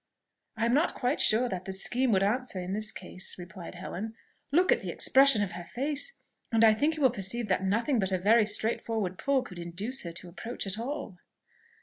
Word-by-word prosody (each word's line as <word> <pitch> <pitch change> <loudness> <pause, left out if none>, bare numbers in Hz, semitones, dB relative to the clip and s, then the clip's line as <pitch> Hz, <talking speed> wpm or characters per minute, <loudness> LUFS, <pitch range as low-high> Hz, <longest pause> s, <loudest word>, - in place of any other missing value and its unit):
"I 225 - +1
am 235 - +1
not 305 +6 +2
quite 255 +4 0
sure 230 +4 +4
that 185 -4 -5
the 190 - -5
scheme 240 +6 0
would 195 -2 +3
answer 225 -1 -1
in 180 +1 -4
this 215 +1 +1
case," 180 0 -1
replied 180 0 -10
Helen. 220 +4 -6 0.4
"Look 360 +5 +3
at - - +3
the - - -5
expression 270 -5 +5
of 195 - -4
her 175 0 -7
face, 285 - -1 0.3
and 225 0 +3
I 220 -1 +7
think 295 +8 0
you 305 - -3
will 260 - +5
perceive 210 +2 -2
that 185 0 +1
nothing 230 +7 +1
but 190 -1 +1
a 185 - +1
very 210 +4 +4
straightforward 215 -3 -1
pull 275 -2 +1
could 180 -8 -10
induce 195 +10 -2
her 170 - -5
to 175 +1 -7
approach 225 +8 -5
at 195 +2 -3
all." 245 -7 -5
220 Hz, 215 wpm, -29 LUFS, 190-255 Hz, 0.4 s, I